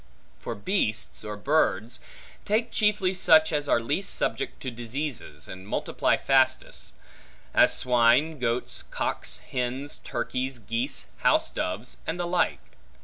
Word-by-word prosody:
For 115 - -5
beasts, 110 - -1
or 105 -1 -5
birds, 120 -3 +1 0.4
take 225 +3 0
chiefly 210 -3 +2
such 160 -3 +5
as 145 -1 0
are - - +4
least 145 +12 -1
subject - - -2
to 130 - -3
diseases, 120 - -5
and 95 +1 -9
multiply - - +1
fastest; 130 -1 +1 0.6
as - - +6
swine, 125 +5 +3
goats, 120 0 -1
cocks, - - -3
hens, 130 +3 -2
turkeys, 130 +1 -2
geese, 115 +5 -2
house - - +2
doves, 105 +7 -4
and 165 +2 -2
the 175 - 0
like. 175 0 -1
130 Hz, 130 wpm, -27 LUFS, 115-155 Hz, 0.6 s, as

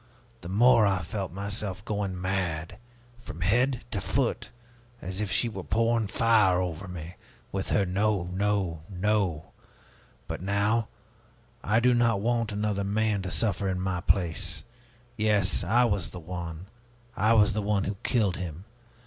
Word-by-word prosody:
the 85 - -8
more 110 +2 +5
I 95 -2 0
felt 95 +1 -4
myself 100 +1 -4
going 100 -3 -2
mad, 90 -2 -2 0.4
from 85 -8 -9
head 120 +7 +1
to - - -1
foot, - - -1 0.5
as 95 +1 -5
if 105 - -2
she 120 - +2
were 100 -4 -5
pouring 115 +5 +1
fire 105 -4 +3
over 90 +1 -3
me, 90 -1 -8 0.3
with 95 0 -3
her 100 - +2
'No, 100 +1 +1
no, 95 -4 0
no!' 95 -4 -1 0.8
But - - -5
now 100 +4 +1 0.8
I 105 +3 +3
do 125 +1 +4
not 120 -3 +3
want 115 +1 0
another 105 -1 -1
man 105 0 0
to 95 - -4
suffer 100 0 0
in 90 -1 -1
my 95 -1 -1
place. 85 -2 0 0.5
Yes, 105 -4 +3
I 120 +7 +3
was 100 -6 0
the 90 - -8
one, 85 0 -6 0.5
I 110 +3 +3
was 105 -2 +5
the 105 - -1
one 100 -1 +1
who 100 +1 -3
killed 105 -9 +1
him! 90 0 -6
100 Hz, 155 wpm, -27 LUFS, 90-110 Hz, 0.8 s, more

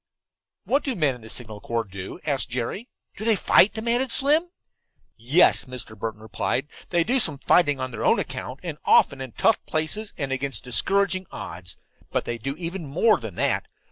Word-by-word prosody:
"What 280 +2 +1
do 265 -4 -1
men 150 -6 +2
in 125 - -12
the 110 - -9
Signal 110 -3 -4
Corps 115 -1 -1
do?" 95 - -8
asked 135 -7 -1
Jerry. 125 - -4 0.3
"Do 215 - -6
they 225 -1 +3
fight?" 195 +1 +5
demanded 235 +3 0
Slim. 305 +7 +3 0.7
"Yes," 130 +10 +4
Mr. 125 -4 -4
Burton 110 0 -5
replied, 130 +5 -2 0.2
"they 175 -2 +2
do 250 +9 +1
some 155 - +2
fighting 145 -1 +3
on 130 0 -3
their - - -5
own - - +4
account, 130 +2 -5
and 160 -4 -5
often 140 -2 +4
in 130 -2 -6
tough 225 - +2
places 160 +8 -2
and 140 -3 -3
against 135 0 -1
discouraging 185 - +1
odds. 90 +1 -7 0.3
But - - -1
they 120 0 -4
do 135 +4 -4
even 170 0 -5
more 180 +11 +3
than 110 -7 -7
that. - - 0
140 Hz, 185 wpm, -24 LUFS, 120-195 Hz, 0.7 s, fight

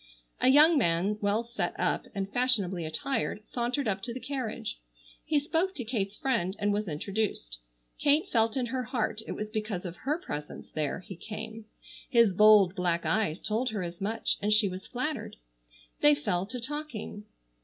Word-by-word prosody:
A - - +3
young 300 +4 +7
man 190 +1 +1
well 205 +3 +1
set 235 0 -3
up, - - 0
and 195 0 -3
fashionably 200 -9 +2
attired, 210 - -2
sauntered 245 +3 -1
up 195 -2 0
to 235 +2 -4
the - - -4
carriage. 250 - -4 0.4
He 305 - +1
spoke 330 +6 0
to 255 - -4
Kate's 210 -4 -2
friend, 220 -9 0
and 205 -1 +1
was 210 0 -1
introduced. 155 - -2 0.4
Kate 295 +2 +3
felt 225 +1 +2
in 255 - +1
her 255 +2 -2
heart 235 -3 -1
it - - -3
was 210 0 -5
because 210 -4 -3
of 175 0 -6
her 295 +4 -1
presence 150 - -7
there 155 +2 -2
he 190 - -9
came. 220 +4 -7 0.4
His 230 -5 +5
bold 210 -2 +7
black 175 -3 0
eyes 210 -7 +1
told 230 +4 0
her 210 -4 -3
as 170 +1 -7
much 220 +3 0
and 205 +1 +1
she 215 -1 +5
was 185 0 -6
flattered. 255 0 -3 0.6
They 150 0 +6
fell 175 +6 -1
to 250 +3 -4
talking. 255 -6 -5
215 Hz, 175 wpm, -29 LUFS, 190-250 Hz, 0.6 s, young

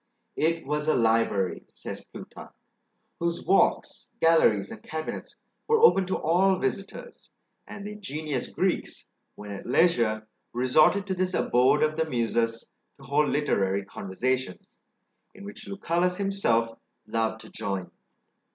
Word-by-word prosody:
"It 165 +1 0
was 150 +2 -2
a 155 - +3
library," 110 -5 +1
says - - -6
Plutarch, - - -11 0.7
"whose 170 0 -2
walks, 195 - +2
galleries, 160 -12 +4
and - - -9
cabinets, 155 0 -6 0.3
were 455 0 +4
open 195 - +5
to 190 - 0
all 185 +4 +3
visitors; 195 - -5 0.4
and 200 -1 -8
the 210 - -5
ingenious 155 -10 -4
Greeks, - - -2 0.3
when 105 0 -9
at 100 - -7
leisure, 115 -7 +2 0.3
resorted 155 +10 +3
to 195 - -2
this 185 0 -1
abode 125 +2 +3
of 155 0 +1
the 160 0 0
Muses 115 -2 -1 0.3
to 135 - -16
hold 145 +3 +1
literary 100 -9 0
conversations, 120 +3 -3 0.7
in 200 - -12
which 205 -1 -10
Lucullus 180 -2 0
himself 120 - 0 0.3
loved 110 -1 -1
to 110 - -13
join." 95 -2 -4
150 Hz, 135 wpm, -27 LUFS, 115-180 Hz, 0.7 s, open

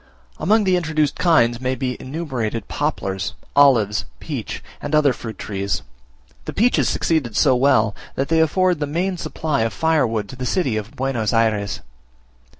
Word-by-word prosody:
Among 215 +1 +3
the 185 -2 +3
introduced 155 -4 0
kinds 120 -9 +3
may 130 0 0
be 130 -2 -2
enumerated 130 - -3
poplars, 95 -2 -2 0.2
olives, 115 -7 +4
peach, 140 -9 -5 0.2
and 145 +1 -1
other 145 -3 +4
fruit 115 -2 -8
trees: 100 -1 -3 0.6
the - - -5
peaches 240 +4 +2
succeed 140 -10 0
so 130 0 +4
well, 125 -5 +3 0.2
that 135 - -1
they 165 0 +2
afford 180 +2 +2
the 145 - -1
main 180 +6 -1
supply 155 -4 -2
of 115 -1 0
firewood 125 -10 +1
to - - -8
the 125 0 -4
city 150 - 0
of 110 +1 -5
Buenos 125 -5 -1
Ayres. 105 -5 +1
130 Hz, 155 wpm, -21 LUFS, 110-160 Hz, 0.6 s, olives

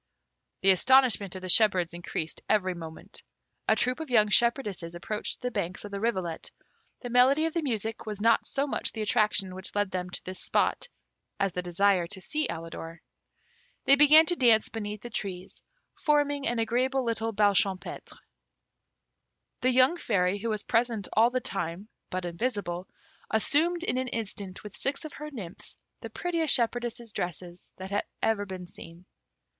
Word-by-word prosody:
The 195 - +6
astonishment 225 -2 +4
of 185 - -7
the 185 - -5
shepherds 185 -4 +4
increased 170 -2 -5
every 185 -3 +2
moment. 165 -2 -10 0.5
A - - +5
troop 250 +4 0
of 320 -3 -6
young 215 -4 +4
shepherdesses 210 -7 +1
approached 210 +5 -2
the 250 0 -2
banks 180 -1 -3
of 205 - -8
the 200 - -4
rivulet. 185 -7 -2 0.5
The 245 - -6
melody 265 +6 +4
of 325 - -2
the 335 - 0
music 225 -6 -3
was 210 -2 -4
not 230 +2 +3
so 275 0 0
much 290 - -3
the 220 - -3
attraction 210 -4 +1
which 190 +2 -5
led 205 -2 0
them 180 -1 -3
to - - -6
this 185 0 -7
spot, - - 0 0.5
as 195 -3 0
the 180 - -2
desire 180 0 +2
to 190 +2 -3
see 300 +11 -2
Alidor. 165 0 -7 0.8
They 275 - +7
began 300 +3 +7
to 350 - +1
dance 230 -7 +4
beneath 210 -2 -5
the 240 - -8
trees, 190 -2 -5 0.3
forming 290 -2 +1
an 240 - 0
agreeable 255 +4 +1
little 225 -1 -1
bal 205 -1 +3
champêtre. 190 -1 -1 1.4
The 255 - +3
young 255 +7 +4
Fairy, 200 - 0
who 230 +3 -3
was 215 -2 -2
present 230 -3 0
all 225 +3 +5
the 255 0 -1
time, 190 -1 -4 0.2
but 185 0 -3
invisible, 180 -1 -3 0.4
assumed 330 +10 +2
in 255 - 0
an 260 - -2
instant, 205 -5 -4
with 210 -1 -9
six 275 +2 -2
of 310 - -7
her 300 +1 -7
nymphs, 200 - -9 0.2
the - - -8
prettiest 335 -4 +2
shepherdesses' 235 -1 -2
dresses 175 +1 -5
that 190 +1 -8
had 205 - 0 0.2
ever 205 -2 +1
been 185 -1 -7
seen. 175 -1 -13
215 Hz, 170 wpm, -28 LUFS, 185-250 Hz, 1.4 s, They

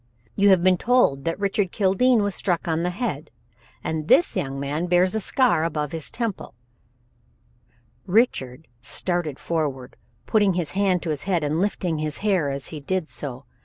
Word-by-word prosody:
You 200 0 +4
have 185 -3 +5
been 185 -1 +4
told 235 - +2
that 165 +3 -2
Richard 200 -2 0
Kildene 215 +4 +3
was 205 -1 -1
struck 175 -1 -1
on 160 0 0
the 175 - 0
head 210 +8 -4 0.5
and 155 -1 -3
this 175 - +4
young 135 0 -2
man 145 +5 -2
bears 180 +1 +3
the 220 - 0
scar 220 -7 +2
above 150 -3 -2
his 160 -2 -4
temple 230 - -4 0.8
" 120 0 -38 0.2
Richard 130 - -5
started 170 +1 -1
forward, 140 -6 -3 0.3
putting 205 -4 +2
his 175 -4 -2
hand 190 -3 +1
to 165 - -2
his 150 +1 -4
head 175 -4 +1
and 150 +3 0
lifting 180 -5 -1
his 155 -1 -3
hair 185 -8 +2
as 140 0 -4
he 155 - -7
did 170 +3 -2
so. 135 -2 -6
170 Hz, 175 wpm, -23 LUFS, 150-195 Hz, 0.8 s, have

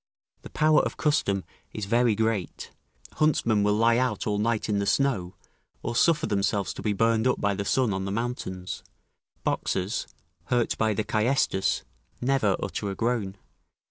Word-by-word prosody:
["The - - -10
power 155 0 +4
of - - -4
custom 100 -11 +1 0.3
is 105 - -4
very 115 +1 +3
great: 110 -4 -2 0.5
huntsmen 115 -8 +2
will 105 0 +2
lie 115 +2 +4
out 130 0 -1
all 105 -2 0
night 115 +1 0
in 105 -2 0
the 100 - -1
snow, 105 -11 +1 0.5
or 120 - -3
suffer 160 +4 +3
themselves 100 - 0
to - - -8
be 105 - 0
burned 115 +3 +2
up 125 - +1
by 100 0 +1
the 100 +1 -3
sun 125 -1 +2
on 95 0 -2
the 95 - -3
mountains; 100 -5 -4 0.6
boxers, 95 +4 -1 0.4
hurt 120 +3 +1
by 110 -1 +2
the 110 - 0
caestus, 110 -2 +1 0.4
never 125 -6 +2
utter 100 - -3
a 95 - -4
groan." 110 -4 -1
110 Hz, 165 wpm, -26 LUFS, 100-120 Hz, 0.6 s, power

